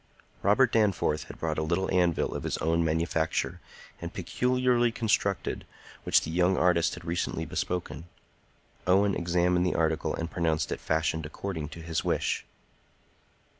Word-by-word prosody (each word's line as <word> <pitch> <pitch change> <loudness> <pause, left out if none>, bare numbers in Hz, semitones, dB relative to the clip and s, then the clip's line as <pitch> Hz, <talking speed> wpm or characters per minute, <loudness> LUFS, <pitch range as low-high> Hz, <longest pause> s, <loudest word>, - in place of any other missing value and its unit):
Robert 115 +5 +4
Danforth 100 -8 +1
had - - -10
brought 80 -1 -2
a - - 0
little 85 +4 0
anvil 90 -2 +2
of - - -4
his - - -2
own 85 +1 +1
manufacture, 80 0 0 0.4
and - - -5
peculiarly 125 -1 +1
constructed, 105 -4 0 0.4
which - - +5
the 80 - -5
young 90 +2 +2
artist 85 -2 +3
had 85 -1 -11
recently 85 +1 -2
bespoken. 90 -3 -3 0.8
Owen 100 +2 +4
examined 90 +1 +2
the 90 - 0
article 80 -1 0
and 85 0 -4
pronounced 80 -2 0
it - - -2
fashioned 80 0 0
according 80 -2 -5
to 80 +1 -9
his 80 -1 -2
wish. - - 0
85 Hz, 145 wpm, -28 LUFS, 80-95 Hz, 0.8 s, which